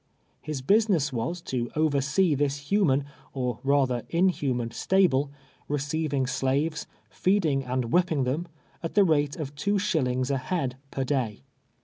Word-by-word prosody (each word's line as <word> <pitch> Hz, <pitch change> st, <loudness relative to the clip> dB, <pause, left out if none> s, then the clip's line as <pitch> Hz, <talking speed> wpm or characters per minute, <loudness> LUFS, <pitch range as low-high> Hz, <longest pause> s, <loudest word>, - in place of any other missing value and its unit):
J -, -, -24 dB, 0.2 s
lis 215 Hz, +2 st, +5 dB
l)usiness 155 Hz, -8 st, +1 dB
was, 145 Hz, +9 st, -2 dB
to 120 Hz, -2 st, -2 dB
oversee 155 Hz, +3 st, +2 dB
this 145 Hz, 0 st, 0 dB
human, 145 Hz, -10 st, +3 dB, 0.3 s
or 125 Hz, -4 st, -2 dB
rather 135 Hz, -3 st, +2 dB
inhuman 145 Hz, -9 st, +1 dB
stahle, 145 Hz, -3 st, +2 dB, 0.4 s
receiving 145 Hz, -1 st, -1 dB
slaves, 140 Hz, +4 st, -1 dB, 0.2 s
feeding 165 Hz, -8 st, +1 dB
and 125 Hz, -2 st, -2 dB
whii)ping 170 Hz, -7 st, +2 dB
them, 150 Hz, +8 st, -2 dB, 0.3 s
at 165 Hz, -, -5 dB
the 205 Hz, -, +6 dB
rate 145 Hz, -5 st, +2 dB
of 145 Hz, -3 st, -5 dB
two 200 Hz, +8 st, 0 dB
shillings 135 Hz, -9 st, 0 dB
a 135 Hz, -, +1 dB
liead 135 Hz, -2 st, -2 dB, 0.2 s
l)er 135 Hz, -, +1 dB
day. 125 Hz, -, -2 dB
145 Hz, 140 wpm, -27 LUFS, 130-170 Hz, 0.4 s, the